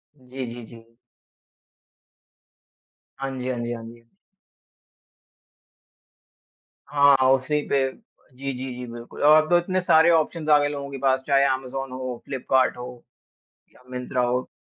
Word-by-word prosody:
जी, 130 -1 -7
जी, 120 - -9
जी। 115 0 -16 2.2
हाँ 135 0 -4
जी, 125 0 -4
हाँ 125 -2 -2
जी, 120 0 -3
हाँ 115 - -7
जी। 115 0 -14 2.7
हाँ, 140 -1 +5
हाँ, 130 0 +4
उसी 135 +3 0
पे 135 -1 +2
जी, 135 - -10
जी, 130 0 -6
जी, 125 0 -7
बिल्कुल। 120 0 -10
और 155 +1 +7
अब 155 - -9
तो 175 - +5
इतने 185 +2 -1
सारे 170 -2 +5
ऑप्शंज़ 160 -1 0
आ 150 - +8
गए 145 - +1
लोगों 140 -1 -5
के 135 - -5
पास। 130 0 +3
चाहे 140 -1 +4
अमेज़न 135 0 -5
हो, 130 -1 -6
फ्लिपकार्ट 130 -1 +1
हो, 125 0 -9 0.7
या - - -21
मिंत्रा 125 0 -3
हो। 125 +1 -1
130 Hz, 150 wpm, -24 LUFS, 125-145 Hz, 2.7 s, आ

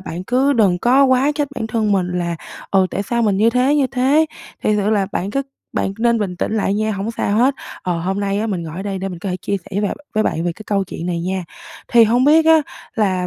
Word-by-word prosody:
bạn 180 -1 -6
cứ 260 +6 +2
đừng 200 -8 +3
có 260 +6 +4
quá 260 +2 +3
trách 290 -1 -1
bản 220 - -3
thân 220 -2 0
mình 185 -2 +1
là, 170 -1 -2 0.3
ờ, 190 -1 +4
tại 200 - -2
sao 235 +3 -1
mình 205 -3 +2
như 220 +3 +4
thế, 250 +4 +2
như 285 -3 +3
thế, 270 +5 +2 0.4
thiệt 215 - +2
sự 205 0 +1
là 200 -3 +2
bạn 190 +3 -2
cứ 275 +5 -1 0.3
bạn 195 - -1
nên 235 0 +2
bình 190 -4 -3
tĩnh 195 - -2
lại 200 -1 +1
nha, 215 +1 0
hổng 200 +2 -3
sao 210 -2 -1
hết. 260 +3 +3 0.3
Ờ, 175 -2 -1
hôm 190 +4 -2
nay 200 0 -1
á, 220 - -1
mình 190 -6 -2
ngồi 160 0 -7
ở 190 - -4
đây 195 -1 -3
để 190 +1 -3
mình 180 -2 -7
có 190 +3 -5
thể 180 - -2
chia 200 +2 -2
sẻ 180 - -12
với 200 +1 -1
bạn 205 - -1 0.2
với 215 - +3
bạn 165 - -1
về 175 - 0
cái 215 - -12
câu 200 -2 0
chuyện 175 -1 -6
này 170 -1 -2
nha. 185 +1 -2 0.4
Thì 235 -1 +6
hông 240 +3 +2
biết 315 +3 +5
á 320 -1 +6 0.3
là 190 -4 +1
205 Hz, 275 wpm, -19 LUFS, 190-240 Hz, 0.4 s, Thì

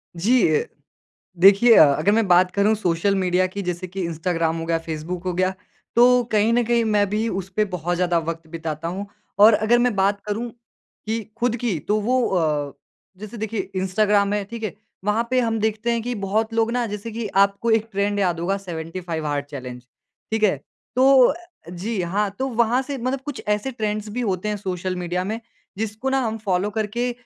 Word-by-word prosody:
जी 230 +7 +3
अ, - - 0 0.7
देखिए 200 +6 +7
अ, - - +9
अगर 155 +8 +1
मैं 220 0 +2
बात 180 0 +4
करूँ 205 +2 +2
सोशल 195 -1 0
मीडिया 185 -1 +2
की 200 +2 -6
जैसे 180 0 -4
कि 190 +2 -5
इंस्टाग्राम 165 0 -1
हो 165 - -4
गया, 165 0 +1
फ़ेसबुक 165 +2 -5
हो 180 - 0
गया, 185 +1 +1 0.4
तो 245 +1 +6
कहीं 215 +2 +3
न 240 0 +3
कहीं 235 0 +2
मैं 210 -2 +3
भी 215 +3 0
उस 190 0 -4
पे 215 0 +2
बहुत 175 0 -1
ज़्यादा 175 -1 +1
वक़्त 165 0 -5
बिताता 160 -1 -5
हूँ। 190 +4 -4 0.3
और 215 +2 +8
अगर 220 +3 +3
मैं 245 -3 +2
बात 200 +1 +2
करूँ 220 +3 -3 0.6
कि 225 +1 -1 0.2
ख़ुद 240 -1 +1
की 230 -6 -1
तो 210 +1 +2
वो 255 +3 +1
अ, 150 -6 0 0.4
जैसे 215 +3 -9
देखिए 220 -1 -3
इंस्टाग्राम 200 +2 +2
है, 210 - 0
ठीक 230 +2 -8
है? 215 - -3 0.3
वहाँ 220 +3 +1
पे 255 - +3
हम 225 -2 0
देखते 220 +2 0
हैं 235 -1 0
कि 245 +1 -2
बहुत 220 +3 0
लोग 225 0 +1
ना 245 0 0
जैसे 210 +2 -6
कि 225 0 -4 0.2
आपको 200 +4 -1
एक 220 0 +2
ट्रेंड 200 0 0
याद 175 -4 +1
होगा 195 +3 0
75 165 -2 -5
हार्ड 145 -1 -1
चैलेंज। 130 -4 -8 0.5
ठीक 220 -1 0
है? 200 - +4 0.4
तो 260 0 +6
अ, - - +1 0.4
जी 190 +4 -3
हाँ, 195 +4 0
तो 265 - 0
वहाँ 235 +1 +2
से 275 0 -5
मतलब 255 +2 -2
कुछ 290 -3 -5
ऐसे 210 +6 0
ट्रेंड्स 215 -2 -3
भी 245 +4 -3
होते 195 -2 -1
हैं 210 - -2
सोशल 185 -1 -3
मीडिया 180 0 -2
में 220 +4 -3 0.4
जिसको 220 +4 -3
न - - -2
हम 230 -4 0
फ़ॉलो 190 +1 +1
करके 220 +3 -2
205 Hz, 205 wpm, -22 LUFS, 180-225 Hz, 0.7 s, अ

